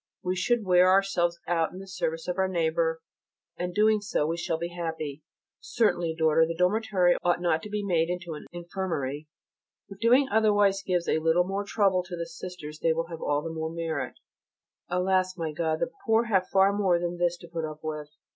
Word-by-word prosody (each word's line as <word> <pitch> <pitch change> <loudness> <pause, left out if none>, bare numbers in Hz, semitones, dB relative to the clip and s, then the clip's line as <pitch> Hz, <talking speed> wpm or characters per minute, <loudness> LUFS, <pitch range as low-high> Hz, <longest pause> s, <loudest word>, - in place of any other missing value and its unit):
We 185 0 -1
should 225 +4 +1
wear 180 0 +5
ourselves 185 -3 +2
out 165 -2 +1
in - - -10
the 195 - -8
service 170 -4 -3
of 180 +1 -2
our 190 - +3
neighbour, 165 -2 0 0.5
and 180 0 -3
doing 215 +2 +3
so 200 -7 0
we 165 +2 -1
shall 170 -1 -2
be 170 +1 -4
happy. 160 -4 -5 0.4
Certainly, 175 -8 0
daughter, 160 0 +4
the 165 +1 -1
dormitory 180 -1 +2
ought 175 0 +2
not 170 -2 +1
to 210 - -8
be 210 0 -2
made 170 -3 +1
into 175 -2 -4
an 150 - -9
infirmary: 170 -5 -4 0.6
if 195 -1 -11
doing 250 +5 +4
otherwise 205 -2 +3
gives 180 -3 -1
a - - +2
little 165 +2 +3
more 195 +2 -2
trouble 200 -3 +2
to 180 -1 -7
the 170 - -3
sisters 165 -2 -8
they 165 - +2
will 165 +1 -3
have 165 -2 -7
all 145 0 0
the 165 - -5
more 160 0 -3
merit. 165 -1 -3 0.7
Alas! 185 +1 +1
my 165 -2 -2
God, 160 +1 -1
the 255 - -1 0.2
poor 225 +1 +4
have 195 -5 +1
far 195 +1 +4
more 195 -4 +2
than 175 0 -3
this 175 0 +1
to 170 - -13
put 165 -1 -4
up 155 0 -6
with. 150 -1 -5
175 Hz, 205 wpm, -27 LUFS, 165-190 Hz, 0.7 s, wear